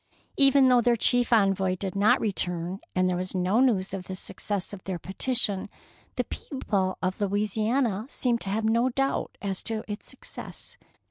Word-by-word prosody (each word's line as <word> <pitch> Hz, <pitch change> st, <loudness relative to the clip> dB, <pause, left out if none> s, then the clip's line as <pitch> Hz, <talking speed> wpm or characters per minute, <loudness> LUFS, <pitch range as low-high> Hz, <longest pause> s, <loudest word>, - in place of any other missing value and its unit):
Even 275 Hz, -1 st, +5 dB
though 250 Hz, -1 st, +5 dB
their 240 Hz, 0 st, +3 dB
chief 245 Hz, +2 st, +3 dB
envoy 195 Hz, -4 st, +3 dB
did 190 Hz, 0 st, -4 dB
not 200 Hz, +2 st, +4 dB
return, 180 Hz, -3 st, -2 dB, 0.2 s
and 185 Hz, 0 st, +3 dB
there 180 Hz, -, +1 dB
was 185 Hz, +1 st, -4 dB
no 185 Hz, +5 st, +2 dB
news 205 Hz, -8 st, +2 dB
of 190 Hz, -2 st, -4 dB
the 190 Hz, -, -5 dB
success 200 Hz, +1 st, -4 dB
of 190 Hz, -, -9 dB
their 190 Hz, -2 st, -3 dB
petition, 200 Hz, +2 st, 0 dB, 0.5 s
the -, -, 0 dB
people 200 Hz, -9 st, -2 dB
of 185 Hz, +3 st, -1 dB
Louisiana 215 Hz, +3 st, 0 dB
seemed 240 Hz, -4 st, 0 dB
to 195 Hz, -, -4 dB
have 215 Hz, +3 st, -1 dB
no 230 Hz, +3 st, +3 dB
doubt 270 Hz, +2 st, -1 dB
as 195 Hz, -2 st, -2 dB
to 220 Hz, -2 st, -3 dB
its 210 Hz, 0 st, -6 dB
success. -, -, -9 dB
205 Hz, 175 wpm, -27 LUFS, 190-235 Hz, 0.5 s, Even